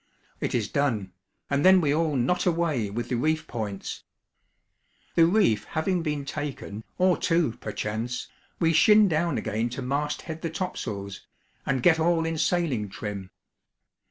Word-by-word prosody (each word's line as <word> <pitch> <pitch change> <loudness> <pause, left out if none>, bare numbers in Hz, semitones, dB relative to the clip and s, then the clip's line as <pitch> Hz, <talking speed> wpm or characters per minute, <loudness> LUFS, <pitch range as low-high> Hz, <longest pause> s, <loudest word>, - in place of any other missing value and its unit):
It - - -2
is 115 -4 0
done, 110 -10 -1 0.3
and 140 +1 0
then 190 0 +7
we 145 -4 +2
all 155 -1 +1
'knot 140 +10 +1
away' 165 - +1
with 120 +4 -4
the 125 - 0
reef 155 +5 0
points. 105 -5 -5 1.1
The 165 -1 +5
reef 170 - +3
having 175 +3 -1
been 150 -3 -2
taken 140 -8 -5
(or 185 -1 +3
two, 165 -6 +2
perchance), 115 +4 -3 0.3
we 165 -1 +3
shin 210 +6 +6
down 170 0 0
again 110 +2 -1
to 125 +2 -5
mast 145 +3 -2
head 160 -1 -7
the 165 - -2
topsails, 105 - -5 0.4
and 130 -2 0
get 165 -2 +5
all 165 0 +2
in 165 -1 -2
sailing 155 - 0
trim. 100 -1 -6
150 Hz, 155 wpm, -26 LUFS, 115-165 Hz, 1.1 s, then